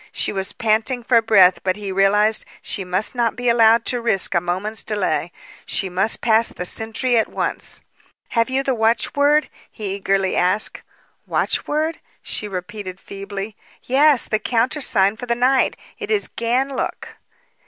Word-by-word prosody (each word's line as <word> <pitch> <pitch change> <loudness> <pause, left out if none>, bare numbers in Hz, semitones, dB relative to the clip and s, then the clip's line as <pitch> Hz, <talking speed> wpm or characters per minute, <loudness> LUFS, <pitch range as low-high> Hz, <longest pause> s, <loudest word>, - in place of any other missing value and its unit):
She - - -1
was 195 0 -3
panting 230 +2 0
for 235 -1 +4
breath; 195 -5 +5
but 185 -1 0
he 205 -2 -6
realized 205 +3 +3 0.2
she 195 - -3
must 185 +3 -1
not 235 -2 0
be 245 0 -1
allowed 230 0 +4
to 245 -1 -1
risk 205 -6 +1
a 170 - +2
moment's 185 +5 -2
delay. 185 -5 -1 0.3
She 190 - -2
must 190 +5 0
pass 225 0 +3
the 180 - -6
sentry 225 +5 0
at 220 - +2
once. - - -3 0.5
"Have 230 +1 +1
you 265 +1 0
the 270 - 0
watchword?" 285 +6 +2 0.2
he 205 -3 -5
eagerly 195 -1 0
asked. 185 +4 +1 0.5
"Watchword?" 310 +2 -1 0.2
she 210 - -4
repeated 190 0 -7
feebly. 200 +2 -7 0.3
"Yes, 280 0 +4
the 215 - -1
countersign 225 -4 +1
for 245 - -7
the 235 - +1
night. 255 +2 +2 0.2
It 425 -2 -6
is 425 -2 +1
Ganlook. 255 +4 -2
220 Hz, 155 wpm, -20 LUFS, 195-245 Hz, 0.5 s, breath